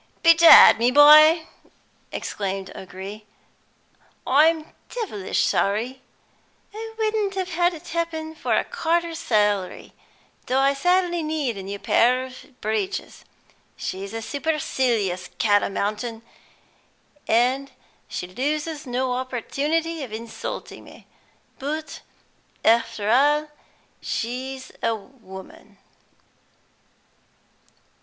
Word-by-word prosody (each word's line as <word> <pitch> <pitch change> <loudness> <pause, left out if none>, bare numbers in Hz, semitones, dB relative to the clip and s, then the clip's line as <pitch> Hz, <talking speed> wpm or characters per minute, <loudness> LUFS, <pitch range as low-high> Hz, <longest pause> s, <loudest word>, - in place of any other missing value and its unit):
"Bedad, 335 -7 +9
my 240 +2 +3
boy," 305 +4 +7 0.6
exclaimed 195 -1 -4
O'Gree, 190 +3 -9 1.0
"I'm 310 +3 +3 0.2
devilish 360 - -2
sorry! 230 +6 0 0.7
I 445 +1 -8
wouldn't 430 -3 -1
have 375 -1 -3
had 350 +1 +1
it 330 +2 -12
happen 320 -1 -3
for 315 - -1
a - - +2
quarter's 340 -6 -1
salary, 205 - 0 0.5
though 255 - +1
I 275 +1 +3
sadly 350 +4 +1
need 305 -6 -2
a 195 - -6
new 200 +1 -6
pair 250 +5 +2
of 255 -1 -13
breeches. 215 -2 -3 0.5
She's 195 +1 -5
a 225 0 -5
supercilious 245 - -1
cat 205 -2 +3
o - - -2
mountain, 215 +3 -3 1.0
and 255 +4 +2 0.4
she - - -5
loses 295 - -3
no 250 +1 -1
opportunity 290 +6 -2
of 250 - -8
insulting 225 +1 -7
me, - - -16 0.5
but 305 +3 -5 0.6
after 230 -2 +2
all 295 +4 +3 0.5
she's 260 +3 -4
a 230 - +1
woman." 195 -4 -13
260 Hz, 100 wpm, -23 LUFS, 220-320 Hz, 1.0 s, Bedad